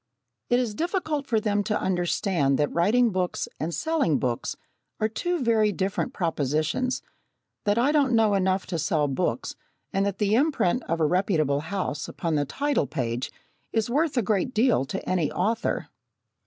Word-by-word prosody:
It 245 - +4
is 240 -4 -1
difficult 315 - -2
for 225 -2 +2
them 205 -1 0
to 210 -1 0
understand 175 -5 +1
that 145 - 0
writing 225 +7 +3
books 185 -2 -1
and 160 +3 -2
selling 300 - +1
books 120 -3 -2 0.4
are 215 - +2
two 345 +8 -2
very 220 -3 +3
different 190 -1 -1
propositions 160 - -1 0.6
that 205 +1 +2
I 255 +5 +3
don't 280 -5 +3
know 220 -2 +4
enough 190 -1 +1
to 170 -3 -3
sell 155 -2 +1
books, 135 -2 -2 0.4
and 195 - +2
that 200 -1 -3
the 205 -1 +1
imprint 250 - +2
of 165 - -1
a 160 - +3
reputable 155 -5 +2
house 160 -2 -3
upon 165 -2 -3
the 145 -1 +1
title 280 - 0
page 125 -4 -3 0.4
is 225 +1 0
worth 295 +1 +1
a 240 - +3
great 210 +4 0
deal 225 - +3
to 190 +8 -5
any 180 -5 +1
author. 225 +5 -1
200 Hz, 170 wpm, -26 LUFS, 165-240 Hz, 0.6 s, It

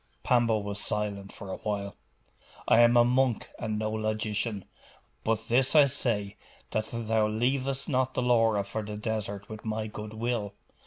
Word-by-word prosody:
Pambo 120 -3 +3
was 100 -1 -4
silent 100 -2 -2
for 100 -1 -8
a - - -4
while. 100 -1 -3 0.7
'I 115 - +6
am 120 0 +6
a 120 - +7
monk 125 -2 +1
and 110 -2 -2
no 110 0 -1
logician. 110 -1 -1 0.6
But 110 0 0
this 130 +5 +2
I 150 -2 +9
say, 105 -6 -1 0.3
that 110 0 -1
thou 110 -2 +1
leavest 130 +5 -1
not 130 -1 0
the 125 - 0
Laura 115 -4 +3
for 100 +2 -3
the 105 0 -6
desert 105 -2 -3
with 110 -1 -9
my 110 0 -2
good 105 0 -7
will. 110 -3 -2
110 Hz, 165 wpm, -29 LUFS, 105-120 Hz, 0.7 s, I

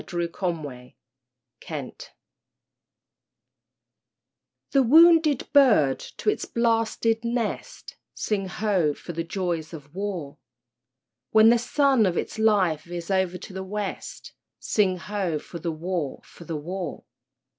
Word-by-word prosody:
A - - -14
WAR 170 0 0 1.3
SONG - - -5 2.8
The 275 - +4
wounded 315 +1 +6
bird 215 - +5
to - - -10
its - - -4
blasted 230 -1 +1
nest, 235 -2 -4 0.2
(Sing 195 -3 -2
ho! 185 -6 0
for 175 - -8
the 165 +1 -2
joys 170 -2 -3
of 145 -2 -11
war!) 185 -7 -5 0.9
When 220 0 +6
the 235 0 +5
sun 260 -2 +3
of 175 -2 -1
its - - -3
life 195 -8 +3
veers 175 +1 -6
o'er 190 -1 +1
to 185 - -11
the 190 0 -5
West, 200 +1 -6 0.2
(Sing 190 -4 +1
ho! 185 -3 -2
for 170 +3 -9
the 165 +1 -2
war, 165 -2 -3
for 170 - -14
the 160 -1 -4
war!) 175 +1 -5
190 Hz, 125 wpm, -25 LUFS, 170-225 Hz, 2.8 s, wounded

